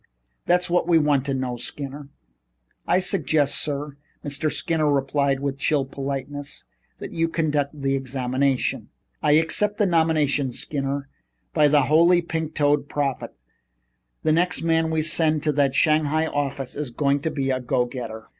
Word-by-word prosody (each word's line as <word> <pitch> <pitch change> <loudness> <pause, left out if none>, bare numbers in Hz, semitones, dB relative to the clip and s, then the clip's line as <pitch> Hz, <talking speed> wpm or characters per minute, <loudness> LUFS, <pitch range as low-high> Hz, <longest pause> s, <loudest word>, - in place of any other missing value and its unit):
That's 180 +1 +3
what 175 -1 +1
we 170 -2 +5
want 145 -3 +2
to 140 - -1
know, 130 -2 -3
Skinner." 140 +3 -6 0.8
"I 180 - +3
suggest, 160 -7 0
sir," 145 -1 -3 0.3
Mr. 145 +2 -2
Skinner 155 -3 0
replied 140 0 +1
with 140 -1 -3
chill 140 -1 +1
politeness, 140 +1 -5 0.3
"that - - -8
you 165 0 0
conduct 150 -3 -1
the 135 0 0
examination." 130 0 -1 0.3
"I 150 - +3
accept 180 +7 +2
the 210 - +3
nomination, 155 -6 +2
Skinner. 140 0 -3 0.5
By 150 -1 +5
the 145 -1 +4
Holy 170 +5 +4
Pink 160 -1 -4
toed 145 -1 +1
Prophet! 140 -3 -2 0.9
The 155 - +2
next 175 +3 +1
man 165 -1 +2
we 160 -1 0
send 155 0 +2
out 155 - -4
to 155 - +2
that 140 -2 +1
Shanghai 155 +1 +2
office 140 -3 -3
is 150 -2 -3
going 140 +3 +1
to 160 - -2
be 135 -3 -1
a 130 - 0
go 125 0 0
getter. 115 -3 -7
145 Hz, 160 wpm, -23 LUFS, 135-160 Hz, 0.9 s, we